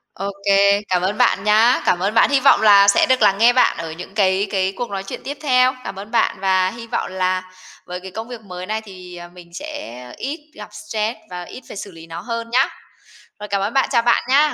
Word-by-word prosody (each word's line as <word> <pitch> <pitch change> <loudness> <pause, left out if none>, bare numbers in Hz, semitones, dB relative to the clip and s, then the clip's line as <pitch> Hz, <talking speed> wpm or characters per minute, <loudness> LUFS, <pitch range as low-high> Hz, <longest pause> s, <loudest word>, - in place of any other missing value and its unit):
Ô 200 +1 -4
kê, 200 0 +4
cảm 180 -1 +1
ơn 200 +3 -1
bạn 195 - +2
nhá. 220 +4 +4
Cảm 175 - +2
ơn 200 +4 -1
bạn. 225 - +4
Hy 280 -1 +3
vọng 275 - +5
là 200 -2 +7
sẽ 200 - +5
được 260 0 +1
lắng 195 0 +4
nghe 235 +3 +5
bạn 250 -9 +3
ở 165 -1 -5
những 180 +4 -9
cái 195 -1 +1
cái 190 -1 0
cuộc 240 +3 -4
nói 195 -1 -4
chuyện - - -8
tiếp 285 +1 -6
theo. 255 -2 +3
Cảm - - -6
ơn 210 +2 -10
bạn 230 -4 +1
và 185 -1 +2
hy 230 +1 -10
vọng 235 - -3
là 185 0 -1 0.4
với 180 0 -6
cái 190 +1 -10
công 225 +4 -6
việc 240 -2 -9
mới 180 -3 -8
này 215 +2 -3
thì, 185 -4 -12
à, 175 0 -9
mình 175 -1 -16
sẽ 240 - -8
ít 300 +2 -7
gặp 210 - -10
stress 215 +1 -4
và 180 0 -6
ít 255 - -11
phải - - -9
xử 200 -1 -7
lý 165 0 -13
nó 165 +1 -7
hơn 230 -1 -5
nhá. 255 +3 +3 0.7
Rồi 210 - -7
cảm 200 0 -1
ơn 205 +4 -2
bạn, 270 - +2
chào 235 - +3
bạn 240 0 +2
nha! 295 +3 +4
200 Hz, 250 wpm, -20 LUFS, 185-235 Hz, 0.7 s, là